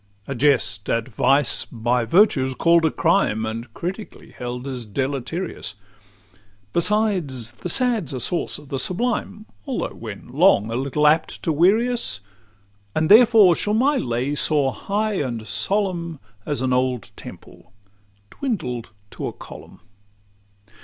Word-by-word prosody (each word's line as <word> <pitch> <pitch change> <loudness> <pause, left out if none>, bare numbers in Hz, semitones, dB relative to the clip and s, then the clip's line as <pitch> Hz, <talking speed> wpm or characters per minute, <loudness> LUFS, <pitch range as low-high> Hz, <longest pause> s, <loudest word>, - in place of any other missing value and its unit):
A 140 - -3
jest 115 -7 +1
at 115 0 0
Vice 135 +4 +3
by 120 +1 -1
Virtue's 130 - +3
call'd 170 +2 +3
a - - +4
crime, 155 - +1
And 115 +1 -6
critically 190 +5 -7
held 125 +1 -6
as 130 -3 -5
deleterious: 135 - -4 1.0
Besides, 170 - +1
the 120 +9 -6
sad's 235 - +2
a 130 - -4
source 170 +8 -1
of 145 -2 -15
the 135 - -3
sublime, 210 - -2 0.2
Although - - -3
when - - -9
long 105 +3 +3
a - - -2
little 140 +4 0
apt 155 +2 +2
to 165 - 0
weary 195 +10 +3
us; 230 - -2 0.8
And 155 0 +1
therefore 220 -5 +7
shall 210 +5 0
my 275 +5 +2
lay 125 - -2
soar 145 -2 +1
high 210 0 -2
and 120 -5 -4
solemn, 170 - -2 0.3
As 145 -3 -2
an 130 -1 +1
old 125 -3 -1
temple - - -13 0.6
dwindled 125 - -4 0.2
to - - -5
a - - -5
column. - - -13
145 Hz, 140 wpm, -22 LUFS, 125-195 Hz, 1.0 s, therefore